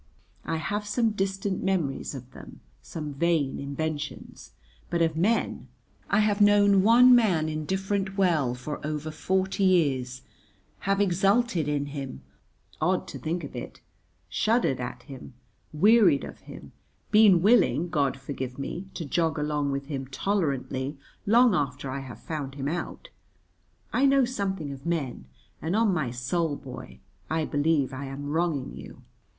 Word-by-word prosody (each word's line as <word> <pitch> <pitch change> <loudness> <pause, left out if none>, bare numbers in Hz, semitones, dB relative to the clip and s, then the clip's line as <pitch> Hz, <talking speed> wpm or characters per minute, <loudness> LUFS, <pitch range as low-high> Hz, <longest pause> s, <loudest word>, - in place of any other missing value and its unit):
I 165 - -1
have 205 +6 -3
some 225 +2 +1
distant 195 -1 -2
memories 170 -8 -1
of 130 -1 -9
them, - - -12 0.2
some 150 -3 -6
vain 155 -2 0
inventions. 145 0 -5 0.4
But 170 -1 +1
of 160 -1 0
men 205 +8 0 0.4
I 205 - +3
have 210 -1 +1
known 205 -1 +5
one 240 +5 +7
man 190 -10 +3
indifferent 190 +5 -2
well 155 -10 +2
for 125 +4 -6
over 155 +1 -3
forty 190 +4 -1
years, 135 -9 +2 0.7
have 195 0 +2
exulted 195 -1 +2
in 145 -1 0
him 140 - -7 0.6
(odd - - +1
to - - -7
think 170 +2 -3
of 140 - -8
it), 120 - -7 0.5
shuddered 220 - +1
at 125 0 -6
him, 135 -3 -11 0.4
wearied 200 -2 +5
of - - -9
him, - - -12 0.4
been 205 -5 +6
willing 180 - +4
(God 140 -4 0
forgive 130 -2 -6
me) 175 +7 -5
to 165 - -4
jog 160 +2 0
along 150 -1 -1
with 140 0 -3
him 135 -2 -5
tolerantly 140 -4 -2 0.3
long 235 +1 +5
after 140 -4 -2
I 135 - -3
have 125 -5 -9
found 145 -4 -5
him 140 -1 -3
out; 175 - -4 0.8
I 275 +2 +4
know 275 -1 +4
something 195 - -3
of 135 -1 -9
men, 145 - -3 0.4
and, 165 +4 -1
on 220 -3 +3
my 155 -8 -1
soul, 145 +6 -1
boy, 130 -7 -10 0.3
I 160 0 0
believe 145 -2 +1
I 135 +2 -5
am 135 +1 -6
wronging 160 -4 -1
you. - - -11
160 Hz, 150 wpm, -27 LUFS, 140-195 Hz, 0.8 s, one